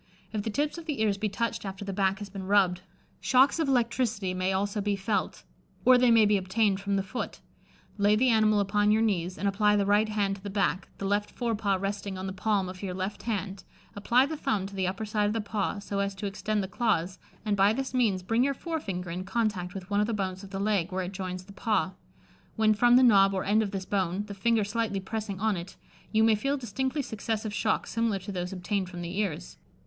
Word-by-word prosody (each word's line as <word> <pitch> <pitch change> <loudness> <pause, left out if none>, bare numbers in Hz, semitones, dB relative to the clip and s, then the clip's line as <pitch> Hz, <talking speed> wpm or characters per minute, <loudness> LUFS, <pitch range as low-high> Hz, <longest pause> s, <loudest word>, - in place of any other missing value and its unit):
If 215 - -1
the 220 - -3
tips 295 +8 -1
of 335 - -12
the 295 -6 -2
ears 200 -2 +1
be 215 0 0
touched 230 +3 -2
after 195 0 -6
the 195 - -4
back 195 0 +1
has 205 -1 -7
been 190 -1 -7
rubbed, 190 -3 +3 0.4
shocks 265 +5 +4
of 320 - +1
electricity 235 -6 0
may 185 +1 0
also 200 +2 -1
be 205 0 0
felt, 200 0 -2 0.4
or 255 - +8
they 250 0 +4
may 225 -2 +6
be 205 0 +4
obtained 195 +1 +1
from 200 0 -1
the 195 - +1
foot. 195 +6 -5 0.6
Lay 205 +1 +4
the 250 +4 +3
animal 215 -2 +4
upon 205 +1 +2
your 220 +1 +4
knees, 185 -4 0
and 200 - -1
apply 210 +1 +3
the 200 -1 +2
right 205 +2 +3
hand 200 -2 0
to - - -16
the 200 - -6
back, 195 -1 0
the 195 - -5
left 205 +1 0
fore 235 -2 -2
paw 205 -2 +1
resting 195 0 -3
on 185 - -5
the 190 - -4
palm 195 0 0
of 185 0 -8
your 185 -3 -4
left 190 +2 -4
hand, 195 -2 -3 0.3
apply 235 +6 +3
the 315 +3 -4
thumb 265 -10 -1
to 200 - -8
the 190 -2 -1
upper 195 +4 -3
side 210 0 0
of 210 - 0
the 225 - -1
paw, 205 -1 -2
so 200 0 -4
as 200 0 -1
to 195 - -6
extend 205 +1 -1
the - - -3
claws, 185 -4 0 0.3
and 210 -1 +1
by 200 +1 +4
this 265 +3 -3
means 215 -8 +1
bring 225 +6 +2
your 275 +1 +1
fore 325 +3 -3
finger 180 - -5
in 180 +2 -4
contact 195 -3 -1
with 190 +1 -8
one 205 - +2
of 210 - +1
the 230 - -1
bones 190 -1 -3
of 195 - -9
the 195 - -5
leg, 200 -3 0
where 185 0 -1
it 180 - -5
joins 185 -1 -5
the 200 +2 -14
paw; 200 -2 0 0.6
when 220 -1 +4
from 240 +3 +5
the 255 - +7
knob 195 -5 +6
or 190 - -1
end 210 +2 +3
of 210 - -1
this 195 -1 -4
bone, 190 -1 -1
the 205 - -7
finger 220 +2 +2
slightly 210 -1 -1
pressing 205 0 -4
on 215 0 +1
it, 175 +1 -7 0.4
you 220 0 +3
may 225 0 +5
feel 275 +7 0
distinctly 265 +4 -2
successive 220 -1 -3
shocks 215 +1 0
similar 230 -3 0
to 195 +2 -7
those 180 -1 -3
obtained 190 0 -2
from 175 -2 -7
the 175 +4 -4
ears. 180 -5 -3
205 Hz, 245 wpm, -28 LUFS, 190-220 Hz, 0.6 s, or